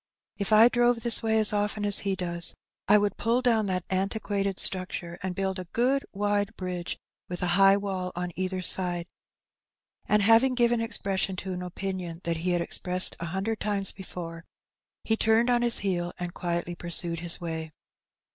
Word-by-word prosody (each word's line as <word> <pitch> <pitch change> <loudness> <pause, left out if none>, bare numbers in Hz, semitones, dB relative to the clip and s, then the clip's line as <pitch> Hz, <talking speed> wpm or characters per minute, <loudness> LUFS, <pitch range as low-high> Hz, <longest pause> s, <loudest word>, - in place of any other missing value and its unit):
If 200 +1 -2
I 215 +2 +8
drove 240 -1 +2
this 235 -2 +3
way 220 -1 +1
as 215 -1 +4
often 210 0 -1
as 205 -1 +5
he 195 -1 -1
does, 175 -2 -1 0.3
I 210 - +7
would 205 0 0
pull 235 +3 +1
down 225 -4 +2
that 185 -2 -2
antiquated 195 0 -1
structure, 185 -2 0
and 185 -1 -3
build 190 0 -2
a 180 - -7
good 260 +4 +2
wide 205 +1 -1
bridge 180 -2 -4 0.3
with 180 0 -4
a 180 - 0
high 195 +1 +6
wall 190 -2 -3
on 175 0 -3
either 185 0 -2
side;*' 175 -1 +1 1.0
and, 210 -1 +3
having 230 +5 +5
given 240 -1 +2
expression 195 -4 -1
to 185 +1 -5
an 180 - -5
opinion 180 -2 -5
that 170 -1 -1
he 175 +3 -2
had 175 -1 +1
expressed 180 +2 0
a 170 - -4
hundred 195 +6 -2
times 200 -2 -1
before, 170 -3 -8 0.6
he 220 - +1
turned 225 +2 +3
on 240 -1 +3
his 240 -1 +1
heel 175 -2 -1
and 175 -1 -5
quietly 175 0 -3
pursued 170 -1 0
his 170 0 +1
way. 160 -2 -5
190 Hz, 180 wpm, -27 LUFS, 180-215 Hz, 1.0 s, I